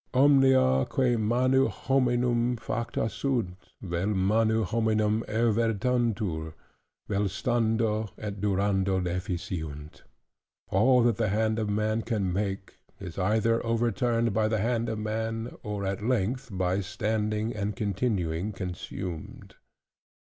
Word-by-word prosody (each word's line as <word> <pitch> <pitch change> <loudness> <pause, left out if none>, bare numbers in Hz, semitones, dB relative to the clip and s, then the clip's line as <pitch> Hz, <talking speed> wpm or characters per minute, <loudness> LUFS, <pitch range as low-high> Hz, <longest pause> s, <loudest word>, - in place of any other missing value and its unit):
"Omnia 130 - +5
quae 125 -2 +2
manu 125 +4 +2
hominum 120 +2 +1
facta 115 0 -2
sunt, 115 -5 -2 0.3
vel 90 0 -2
manu 110 +3 +2
hominum 110 +1 +1
evertuntur, 110 -6 0 0.5
vel 105 0 0
stando 110 -1 0
et 100 -2 -6
durando 95 -1 +1
deficiunt": 85 -4 -4 0.7
"All 120 +6 +4
that 115 -3 +2
the 110 -3 +1
hand 110 +2 +1
of 110 -2 -1
man 110 +2 0
can 105 -6 -1
make, 95 0 -3 0.2
is 90 -1 -7
either 110 +4 +2
overturned 115 0 +1
by 110 +1 +2
the 110 0 0
hand 115 +2 0
of 110 - -2
man, 110 +2 -3
or 105 -2 -4
at 95 +1 -3
length 125 +2 0
by 95 0 0
standing 105 +2 -1
and 105 -1 -2
continuing 100 -3 -1
consumed." 90 -2 -6
110 Hz, 115 wpm, -28 LUFS, 95-115 Hz, 0.7 s, Omnia